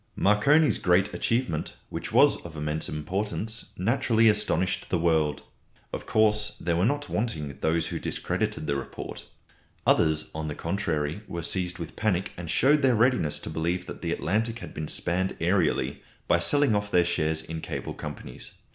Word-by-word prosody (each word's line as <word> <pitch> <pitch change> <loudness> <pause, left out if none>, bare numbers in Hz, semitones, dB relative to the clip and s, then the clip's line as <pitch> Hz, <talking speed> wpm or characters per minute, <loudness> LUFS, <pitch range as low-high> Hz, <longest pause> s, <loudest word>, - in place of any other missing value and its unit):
Marconi's 140 +10 +4
great 95 +3 +3
achievement, 115 -10 -1 0.2
which - - -5
was - - +5
of 80 -2 -9
immense 75 +1 -2
importance, 105 +8 -3
naturally 115 +2 +3
astonished 105 -3 0
the 90 - +2
world. 80 -4 +1 0.5
Of - - -5
course, 105 -1 +2
there 85 0 0
were 90 +5 +3
not 145 +2 -1
wanting 80 - -2
those 80 +1 +1
who - - -3
discredited 75 - -2
the 70 -1 0
report. 65 - -7 0.6
Others, 80 -1 +3
on 80 0 -4
the 75 - -4
contrary, 80 -2 -2
were 85 -1 -5
seized 90 +1 -2
with 85 -2 -7
panic 100 -4 0
and 85 -2 -7
showed 140 - +4
their 130 -3 +4
readiness 115 - +2
to - - -6
believe 85 +3 -1
that - - -8
the - - -2
Atlantic 110 +6 0
had - - -9
been 75 0 -4
spanned 90 +4 -1
aërially, 90 +3 +1 0.3
by - - +4
selling 145 -6 +3
off 105 0 -1
their 90 -3 +4
shares 80 -2 0
in 80 0 -6
cable - - -5
companies. 60 - -8
90 Hz, 165 wpm, -27 LUFS, 80-110 Hz, 0.6 s, was